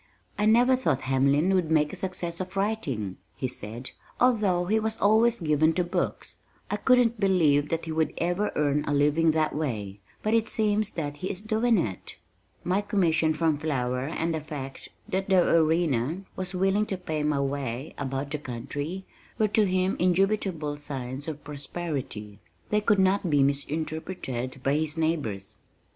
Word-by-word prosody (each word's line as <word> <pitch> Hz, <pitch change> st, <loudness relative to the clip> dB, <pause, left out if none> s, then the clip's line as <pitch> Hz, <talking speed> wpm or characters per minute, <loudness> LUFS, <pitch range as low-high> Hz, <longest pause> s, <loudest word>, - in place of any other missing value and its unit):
"I 210 Hz, 0 st, +1 dB
never 245 Hz, +4 st, +5 dB
thought 245 Hz, -, 0 dB
Hamlin 140 Hz, +7 st, +2 dB
would 180 Hz, -4 st, +1 dB
make 150 Hz, -2 st, +2 dB
a -, -, -4 dB
success 180 Hz, -2 st, -4 dB
of 185 Hz, +1 st, -5 dB
writing," 140 Hz, -, -2 dB, 0.2 s
he 130 Hz, -, -2 dB
said, 120 Hz, +1 st, -7 dB, 0.3 s
"although 210 Hz, -8 st, +3 dB
he 215 Hz, +4 st, +2 dB
was 220 Hz, 0 st, -1 dB
always 225 Hz, +2 st, +4 dB
given 155 Hz, 0 st, +3 dB
to 180 Hz, -, +1 dB
books. 175 Hz, -, -3 dB, 0.3 s
I -, -, 0 dB
couldn't 245 Hz, -3 st, +3 dB
believe 155 Hz, -7 st, +3 dB
that 165 Hz, 0 st, -2 dB
he 160 Hz, -, -4 dB
would 160 Hz, 0 st, 0 dB
ever 180 Hz, +5 st, 0 dB
earn 145 Hz, 0 st, +1 dB
a 145 Hz, -, 0 dB
living 150 Hz, +3 st, +3 dB
that 155 Hz, -1 st, +1 dB
way, 105 Hz, -10 st, -3 dB, 0.2 s
but 215 Hz, -, +1 dB
it 225 Hz, -1 st, +2 dB
seems 210 Hz, -1 st, +1 dB
that 145 Hz, -3 st, -4 dB
he 185 Hz, -, -4 dB
is 200 Hz, +1 st, -5 dB
doing 220 Hz, +1 st, +2 dB
it." 100 Hz, -, -3 dB, 0.5 s
My 185 Hz, +3 st, +1 dB
commission 165 Hz, -6 st, +2 dB
from 155 Hz, -2 st, +1 dB
Flower 130 Hz, -4 st, -1 dB
and 165 Hz, +1 st, -1 dB
the 160 Hz, -, -2 dB
fact 140 Hz, -3 st, -7 dB, 0.2 s
that 190 Hz, +1 st, -2 dB
the 185 Hz, -2 st, +5 dB
Arena 160 Hz, -1 st, +2 dB
was 185 Hz, 0 st, -4 dB
willing 195 Hz, +3 st, +2 dB
to 195 Hz, -, -2 dB
pay 160 Hz, -4 st, -3 dB
my 150 Hz, -1 st, +1 dB
way 135 Hz, 0 st, -3 dB
about 135 Hz, +1 st, -3 dB
the 150 Hz, -, -2 dB
country, 145 Hz, +8 st, -5 dB, 0.3 s
were 215 Hz, -1 st, +2 dB
to 210 Hz, 0 st, +3 dB
him 185 Hz, +1 st, +1 dB
indubitable 180 Hz, -4 st, +1 dB
signs 135 Hz, -1 st, -6 dB
of 150 Hz, -2 st, -6 dB
prosperity. 140 Hz, -, -5 dB, 0.3 s
They 210 Hz, 0 st, +2 dB
could 210 Hz, 0 st, +3 dB
not 190 Hz, -1 st, +2 dB
be 145 Hz, -2 st, +4 dB
misinterpreted 140 Hz, -3 st, -3 dB
by 135 Hz, -, +2 dB
his 155 Hz, 0 st, -2 dB
neighbors. 145 Hz, -12 st, -2 dB
160 Hz, 170 wpm, -27 LUFS, 140-190 Hz, 0.5 s, never